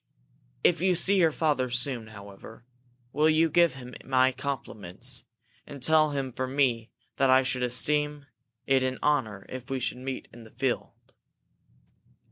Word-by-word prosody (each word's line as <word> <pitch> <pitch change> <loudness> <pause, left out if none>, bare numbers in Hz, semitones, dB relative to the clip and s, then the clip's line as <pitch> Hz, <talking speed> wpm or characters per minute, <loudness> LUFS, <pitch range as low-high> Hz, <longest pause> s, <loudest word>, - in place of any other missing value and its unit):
If 170 -1 +3
you 185 -1 +3
see 195 +4 +3
your 165 -3 +4
father 145 -5 0
soon, 120 -2 -1
however, 105 +2 -12 0.5
will 155 +2 +3
you 160 0 +3
give 170 -2 +4
him 125 -1 -10
my 130 0 +3
compliments? 125 -3 -5 0.4
And 140 - -9
tell 155 0 +4
him 135 -3 -3
from 130 +2 -4
me 120 -5 +1 0.3
that 135 -1 +3
I 130 +1 +6
should 125 -1 -1
esteem 145 +4 0 0.4
it 135 -1 +3
an 130 0 -1
honor 115 -10 0
if 130 -1 -8
we 135 -1 -2
should 125 0 -3
meet 130 0 -5
in 120 - -12
the 110 - -14
field?" 130 +2 -2
130 Hz, 155 wpm, -27 LUFS, 125-150 Hz, 0.5 s, I